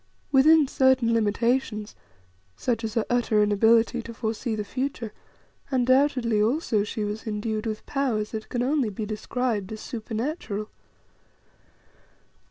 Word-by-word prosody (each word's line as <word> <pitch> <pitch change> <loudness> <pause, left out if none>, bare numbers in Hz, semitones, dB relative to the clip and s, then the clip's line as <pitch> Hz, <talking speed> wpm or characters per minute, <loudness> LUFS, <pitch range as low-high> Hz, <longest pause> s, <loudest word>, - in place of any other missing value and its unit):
Within 295 +2 +6
certain 260 -3 +3
limitations 225 0 0 0.6
such 240 -2 -1
as 220 +1 -4
her 225 - +1
utter 230 -3 +2
inability 225 +3 +3
to 230 0 -9
foresee 225 0 -2
the 210 - -3
future 255 -1 -4 0.6
undoubtedly 255 -3 +2
also, 225 -2 +1
she 215 +1 -4
was 210 +2 -4
endued 215 +1 -2
with 215 -1 -4
powers 245 -7 -1
that 220 -1 -6
can 245 -1 -1
only 270 -3 +1
be 210 +2 -5
described 215 -1 -2
as 220 - -6
supernatural. 220 - -4
230 Hz, 125 wpm, -26 LUFS, 215-255 Hz, 0.6 s, Within